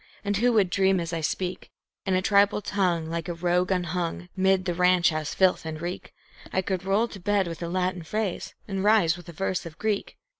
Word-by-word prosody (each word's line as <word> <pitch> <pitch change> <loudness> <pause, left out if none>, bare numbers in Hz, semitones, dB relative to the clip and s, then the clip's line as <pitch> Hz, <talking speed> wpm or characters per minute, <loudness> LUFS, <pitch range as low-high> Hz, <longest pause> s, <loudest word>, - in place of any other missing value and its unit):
And 205 0 0
who 245 +4 +3
would 200 -5 +3
dream 190 -1 +3
as 170 0 -4
I 165 - -2
speak 180 +3 -3 0.4
In 190 - +2
a 185 - +1
tribal 200 +1 +4
tongue 185 -5 0
like 165 0 -4
a 170 - -3
rogue 180 +1 +1
unhung, 175 -1 -2
'mid 190 0 +2
the 175 - 0
ranch 180 -1 +4
house 155 -1 -3
filth 185 -1 +3
and 160 -1 -5
reek, 175 +2 -5 0.4
I 190 - 0
could 190 -1 -2
roll 200 +4 +2
to 200 - -9
bed 200 0 +1
with 165 -1 -6
a 170 - -3
Latin 185 0 -1
phrase 200 +3 -3
and 195 -1 -2
rise 205 -6 +4
with 175 0 -12
a - - -6
verse 190 +2 -2
of 165 -2 -10
Greek? 215 -2 -2
185 Hz, 220 wpm, -26 LUFS, 170-195 Hz, 0.4 s, tribal